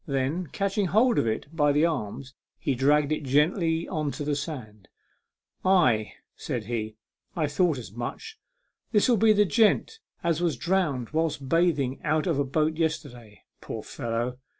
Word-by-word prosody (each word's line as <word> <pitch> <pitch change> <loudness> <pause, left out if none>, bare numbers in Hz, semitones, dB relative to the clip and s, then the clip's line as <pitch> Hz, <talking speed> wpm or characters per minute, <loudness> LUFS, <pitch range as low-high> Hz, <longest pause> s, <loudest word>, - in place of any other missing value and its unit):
Then, 140 +5 -1
catching 200 +5 -1
hold 225 +7 +3
of - - +1
it 110 0 -1
by 145 -2 +3
the 150 +3 +3
arms, 135 -4 -3 0.2
he 140 - -1
dragged 145 +3 +2
it 155 - 0
gently 160 +4 +1
on 155 -4 -2
to 150 - -5
the 145 0 0
sand. 120 - -7 0.4
" - - -51
Ay," 160 - +3 0.2
said 120 -3 -4
he; 110 -1 -4 0.2
" - - -45
I 160 - +1
thought 150 +1 +1
as 115 -6 -8
much. 120 - -6 0.5
This'll 230 +3 +4
be 220 +1 +4
the 210 0 +4
gent 225 - +2 0.2
as 170 -1 +1
was 170 -4 0
drowned 170 -10 0
whilst 155 -3 -1
bathing 150 -5 +1
out 155 0 +1
of 165 -6 0
a - - +3
boat 155 +3 0
yesterday. 125 -9 -4 0.2
Poor - - -6
fellow 120 +2 -3
150 Hz, 170 wpm, -26 LUFS, 130-170 Hz, 0.5 s, This'll